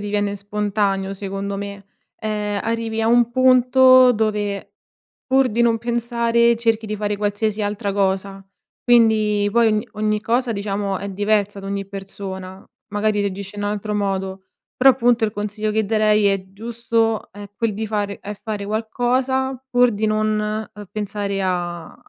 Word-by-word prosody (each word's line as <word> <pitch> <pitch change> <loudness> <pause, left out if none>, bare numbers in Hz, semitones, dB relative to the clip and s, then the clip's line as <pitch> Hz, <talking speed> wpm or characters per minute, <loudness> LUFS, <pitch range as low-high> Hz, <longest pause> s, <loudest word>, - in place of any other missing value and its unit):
diviene 205 0 -1
spontaneo 200 -1 -1
secondo 195 0 -4
me. 200 -1 -7 0.3
Ehm, 210 -2 -2
arrivi 225 0 -2
a 225 - +1
un 240 0 +4
punto 255 0 +6
dove, 210 -2 -2 0.5
pur 265 0 +3
di 230 +3 -1
non 235 -1 +4
pensare, 235 0 +1
cerchi 225 -1 0
di 215 0 -3
fare 205 0 -2
qualsiasi 210 +1 -1
altra 205 0 -2
cosa. 195 0 -1 0.4
Quindi 215 -4 +3
poi 235 -1 +4
ogn 215 0 +1
ogni 215 0 0
cosa 240 +2 0
diciamo 200 -1 -2
è 200 - -5
diversa 205 0 0
da 195 - -8
ogni 200 0 -3
persona, 195 -1 -8 0.3
magari 210 0 0
reagisce 200 0 -4
in 205 - -3
altro 210 +1 -2
modo, 195 -1 -2 0.3
però 270 +1 +7
appunto 240 -2 +2
il 210 - -1
consiglio 210 +1 -3
che 220 0 +1
darei 215 0 +3
è 195 -1 +1
giusto 225 0 -1
è 205 0 -10
quel 225 -1 -1
di 220 +1 -3
fare 205 -1 -2
è 210 +1 -6
fare 210 -2 -4
qualcosa 250 +4 -1
pur 245 -1 +4
di 215 +1 -1
non, 215 0 -1
uhm, 205 -1 -10
pensare 200 -1 -3
a 175 -3 -3
210 Hz, 155 wpm, -21 LUFS, 200-230 Hz, 0.5 s, però